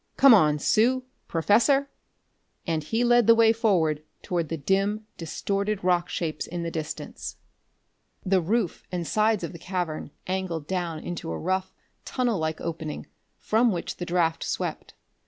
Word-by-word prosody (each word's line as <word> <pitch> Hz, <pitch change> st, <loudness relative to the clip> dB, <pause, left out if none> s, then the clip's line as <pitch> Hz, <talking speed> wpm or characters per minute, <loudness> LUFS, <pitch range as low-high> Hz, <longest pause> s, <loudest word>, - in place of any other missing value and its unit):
"Come 275 Hz, -2 st, +8 dB
on, 150 Hz, -8 st, +5 dB
Sue, 245 Hz, -, +2 dB, 0.2 s
Professor!" 255 Hz, -, +3 dB, 0.7 s
And 160 Hz, -3 st, -1 dB
he 225 Hz, +10 st, 0 dB
led 240 Hz, -2 st, +4 dB
the 230 Hz, -, +8 dB
way 225 Hz, -1 st, +5 dB
forward 175 Hz, -10 st, +2 dB, 0.2 s
toward 170 Hz, -4 st, -1 dB
the 165 Hz, -, -2 dB
dim, 195 Hz, +7 st, 0 dB
distorted 200 Hz, +5 st, -2 dB
rock 180 Hz, -1 st, +2 dB
shapes 155 Hz, -3 st, -3 dB
in 175 Hz, 0 st, -4 dB
the 165 Hz, -, -3 dB
distance. 155 Hz, -1 st, -5 dB, 0.9 s
The 190 Hz, -1 st, +3 dB
roof 195 Hz, +1 st, -1 dB
and 175 Hz, -2 st, -2 dB
sides 215 Hz, +3 st, +2 dB
of -, -, -3 dB
the 170 Hz, -, -9 dB
cavern 175 Hz, -5 st, -3 dB, 0.2 s
angled 185 Hz, -4 st, -2 dB
down 170 Hz, -3 st, -3 dB
into 175 Hz, -, -5 dB
a 80 Hz, -, -3 dB
rough, 185 Hz, +1 st, -1 dB, 0.3 s
tunnel 245 Hz, -6 st, 0 dB
like 160 Hz, 0 st, -2 dB
opening, 160 Hz, -2 st, -5 dB, 0.3 s
from 230 Hz, +2 st, +2 dB
which 175 Hz, -3 st, -4 dB
the 175 Hz, -, -4 dB
draft 170 Hz, -2 st, +1 dB
swept. -, -, -4 dB
180 Hz, 155 wpm, -26 LUFS, 165-215 Hz, 0.9 s, Come